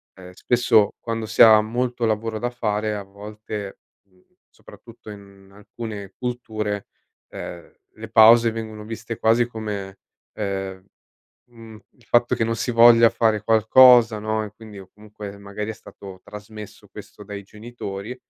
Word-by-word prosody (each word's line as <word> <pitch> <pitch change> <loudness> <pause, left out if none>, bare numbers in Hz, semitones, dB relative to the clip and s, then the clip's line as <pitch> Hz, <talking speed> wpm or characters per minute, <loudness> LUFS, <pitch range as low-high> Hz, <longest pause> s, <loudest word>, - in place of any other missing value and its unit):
ehm, 90 -1 -13
spesso, 115 0 +2
quando 115 -1 -4
si 110 +2 +5
ha 110 -2 +8
molto 120 +2 -2
lavoro 110 0 -2
da 120 - -2
fare, 105 -3 -2
a 100 - -6
volte, 105 0 -9 0.2
mhmm, 95 -2 -31 0.3
soprattutto 115 -2 -16
in 100 -1 -15
alcune 105 -1 -9
culture, 110 -4 -4 0.4
ehm, 85 -1 -9 0.2
le 110 +1 -10
pause 115 +1 +6
vengono 110 -1 -7
viste 115 +1 -7
quasi 115 +2 +3
come, 105 -4 -7 0.3
ehm, 95 -2 -5 0.7
mhmm, 115 -2 -14 0.2
il 120 - -25
fatto 120 +1 +2
che 115 - 0
non 115 0 -1
si 125 - -3
voglia 115 0 +6
fare 110 -3 0
qualcosa, 115 +1 +5
no, 110 0 -2
e 105 - -10
quindi 110 -2 -13
o 95 -1 -13
comunque, 105 -1 -11
magari, 100 +2 -6
è - - -4
stato 95 -2 -13
trasmesso 105 0 -12
questo - - -13
dai 100 -1 -8
genitori, 105 +1 -8
110 Hz, 150 wpm, -22 LUFS, 100-115 Hz, 0.7 s, ha